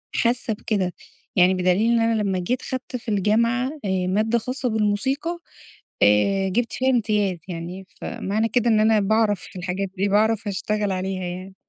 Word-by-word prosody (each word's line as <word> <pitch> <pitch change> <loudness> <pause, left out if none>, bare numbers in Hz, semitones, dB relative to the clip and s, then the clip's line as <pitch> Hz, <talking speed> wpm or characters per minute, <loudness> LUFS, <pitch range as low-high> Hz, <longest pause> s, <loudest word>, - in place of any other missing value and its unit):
حاسّة 235 -1 +1
بكده، 200 -4 -2 0.4
يعني 185 0 +5
بدليل 185 +5 +2
إن 235 - +3
أنا 225 -1 +2
لما 195 -3 0
جيت 240 +8 -1
خدت 260 0 -5
في 245 -1 -5
الجامعة، 230 +5 +2 0.2
آآ 185 -1 0
مادة 215 +5 +1
خاصة 255 +2 -2
بالموسيقى، 265 +10 0 0.6
آآ 190 - +4
جِبت 230 +5 -1
فيها 260 +1 +1
امتياز 210 -6 +1
يعني، 180 +2 -6
فمعنى 215 +4 -2
كده 240 0 +1
إن 215 -1 +4
أنا 215 0 +4
باعرف 210 -1 +2
في - - -10
الحاجات 185 +2 -3
دي، 195 +2 +1
باعرف 215 +2 +2
أشتغل 205 +1 -1
عليها 185 0 -3
يعني. 185 +2 -6
210 Hz, 165 wpm, -23 LUFS, 190-230 Hz, 0.6 s, يعني